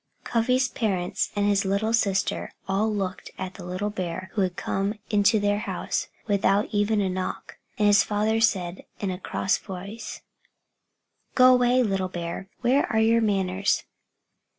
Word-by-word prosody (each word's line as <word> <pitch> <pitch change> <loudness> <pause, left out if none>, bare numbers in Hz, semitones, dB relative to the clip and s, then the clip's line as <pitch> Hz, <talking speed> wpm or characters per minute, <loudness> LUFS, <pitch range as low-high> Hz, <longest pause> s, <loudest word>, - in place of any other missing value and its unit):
Cuffy's 255 +3 +2
parents 190 -7 -1
and 205 0 +1
his 200 -1 +3
little 200 +3 0
sister 195 -4 0
all 200 +3 +1
looked 195 -2 -3
at 190 0 -5
the 185 - -10
little 185 +4 -3
bear 185 -1 -5
who 205 - 0
had 185 -2 0
come 195 +3 -1 0.2
into 210 +1 +4
their 205 0 +1
house - - -3 0.2
without 200 0 +2
even 205 0 +2
a 195 - +1
knock. 185 0 -4 0.2
And 210 - +2
his 205 0 +6
father 215 +2 0
said, 185 -5 +1 0.2
in 195 -2 -2
a 180 - -5
cross 190 0 0
voice 200 +4 -7 1.1
"Go 255 0 +7
away, 250 0 +4
little 195 -4 -1
bear. 175 +2 -5
Where 260 +3 +2
are 220 - +2
your 225 +1 +4
manners?" 195 -2 +1
205 Hz, 155 wpm, -25 LUFS, 190-220 Hz, 1.1 s, Go